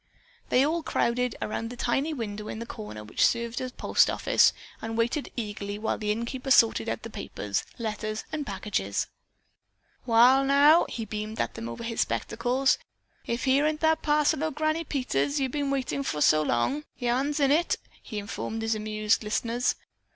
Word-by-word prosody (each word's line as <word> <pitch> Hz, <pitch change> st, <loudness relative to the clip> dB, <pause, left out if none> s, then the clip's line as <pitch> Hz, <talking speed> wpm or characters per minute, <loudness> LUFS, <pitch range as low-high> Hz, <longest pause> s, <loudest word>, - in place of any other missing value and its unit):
They 260 Hz, +2 st, +4 dB
all 330 Hz, +3 st, 0 dB
crowded 250 Hz, -4 st, 0 dB
around 225 Hz, +2 st, -3 dB
the 245 Hz, -, -9 dB
tiny 270 Hz, +6 st, 0 dB
window 215 Hz, -6 st, -5 dB
in -, -, -5 dB
the 230 Hz, -, -5 dB
corner 105 Hz, -, -8 dB
which 105 Hz, -, -1 dB
served 235 Hz, 0 st, +1 dB
as 255 Hz, -1 st, -4 dB
postoffice -, -, +3 dB, 0.3 s
and 225 Hz, 0 st, -4 dB
waited 240 Hz, +6 st, 0 dB
eagerly 205 Hz, -2 st, -4 dB
while 220 Hz, +1 st, -2 dB
the 210 Hz, -1 st, 0 dB
innkeeper 235 Hz, +4 st, -3 dB
sorted 225 Hz, -, +4 dB
out 115 Hz, -, -3 dB
the -, -, -7 dB
papers, 100 Hz, -1 st, -3 dB
letters 215 Hz, -1 st, -3 dB
and 310 Hz, -1 st, -2 dB
packages. 190 Hz, -, -2 dB, 1.0 s
"Wall, 245 Hz, +4 st, +6 dB
now," 285 Hz, +4 st, +5 dB
he 225 Hz, -, -4 dB
beamed 215 Hz, +1 st, -5 dB
at -, -, -1 dB
them 115 Hz, -, -6 dB
over 115 Hz, -, -7 dB
his 230 Hz, 0 st, -1 dB
spectacles, 245 Hz, +4 st, +1 dB, 0.5 s
"if 235 Hz, +1 st, -2 dB
here 275 Hz, +3 st, +3 dB
ain't 310 Hz, 0 st, -2 dB
that 320 Hz, 0 st, +3 dB
parcel 300 Hz, 0 st, +2 dB
ol' 320 Hz, -, +1 dB
Granny 310 Hz, +2 st, -1 dB
Peters 275 Hz, -, -1 dB
been 275 Hz, +1 st, -1 dB
waitin' 275 Hz, 0 st, -1 dB
fer 155 Hz, -, -2 dB
so 155 Hz, +1 st, +5 dB
long. 155 Hz, -, 0 dB
Yarn's 265 Hz, +4 st, 0 dB
in 280 Hz, -1 st, +3 dB
it," 335 Hz, +4 st, +3 dB, 0.3 s
he 215 Hz, -, -7 dB
informed 210 Hz, +2 st, -4 dB
his 225 Hz, 0 st, +1 dB
amused 215 Hz, 0 st, 0 dB
listeners. 230 Hz, +3 st, 0 dB
235 Hz, 170 wpm, -27 LUFS, 215-275 Hz, 1.0 s, Wall